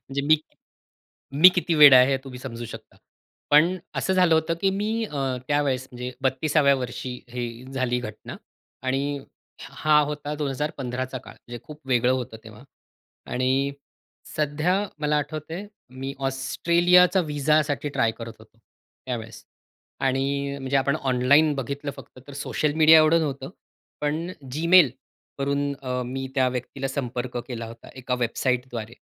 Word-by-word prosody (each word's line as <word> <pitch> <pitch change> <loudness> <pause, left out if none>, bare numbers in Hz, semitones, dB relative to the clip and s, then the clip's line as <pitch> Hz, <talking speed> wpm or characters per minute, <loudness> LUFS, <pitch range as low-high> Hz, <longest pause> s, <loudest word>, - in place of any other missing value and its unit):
म्हणजे 140 +1 -2
मी 155 - +6 1.1
मी 185 - +11
किती 175 -2 0
वेडा 145 -3 +9
आहे 125 +2 +5
हे 135 - +2
तुम्ही 125 -2 -9
समजू 120 -3 -7
शकता. - - -11 0.5
पण 165 +5 +5 0.2
असं 190 - 0
झालं 180 -3 +4
होतं 160 +1 +1
की 195 - +3
मी 220 +3 -1
अ, 150 -9 -7 0.3
त्यावेळेस 140 -3 0
म्हणजे 125 0 -6
32व्या 140 +2 +2
वर्षी 125 -1 -5
हे 120 0 -4 0.3
झाली 125 -1 0
घटना. 110 -3 -8 0.5
आणि 140 +2 -1 0.5
हा 150 -1 +3
होता 150 0 -3
2015चा 135 -3 -3
काळ, - - -12
म्हणजे 120 0 -10
खूप 150 0 -11
वेगळं 125 -1 +3
होतं 125 -3 -3
तेव्हा. 110 +2 -13 0.7
आणि 130 +2 +1 0.6
सध्या 150 +4 0 0.3
मला 150 0 +1
आठवतंय 155 +6 -5 0.4
मी 135 +1 -4
ऑस्ट्रेलियाचा 175 +7 +3
व्हिसासाठी 150 -1 0
ट्राय 115 -5 +1
करत 115 -1 -7
होतो 110 +1 -19
त्यावेळेस. 115 0 -9 0.6
आणि 140 +1 -1
म्हणजे 135 +1 0
आपण 140 +2 +1
ऑनलाईन 140 +3 +3
बघितलं 140 +2 -4
फक्त - - -13
तर 140 - -10
सोशल 145 +1 -1
मीडिया 160 0 +7
एवढं 155 +2 +5
नव्हतं, 135 -2 -3 0.5
पण 155 +4 -1 0.3
Gmail 170 -1 +6 0.5
वरून 140 +1 0
अ, 125 -1 -2
मी 130 +2 -4
त्या 130 -1 +3
व्यक्तीला 130 +2 -4
संपर्क 125 -2 -4
केला 115 -2 -5
होता, 115 0 -12
एका 125 -1 -2
वेबसाईटद्वारे. 120 -1 -2
140 Hz, 140 wpm, -24 LUFS, 125-150 Hz, 1.1 s, मी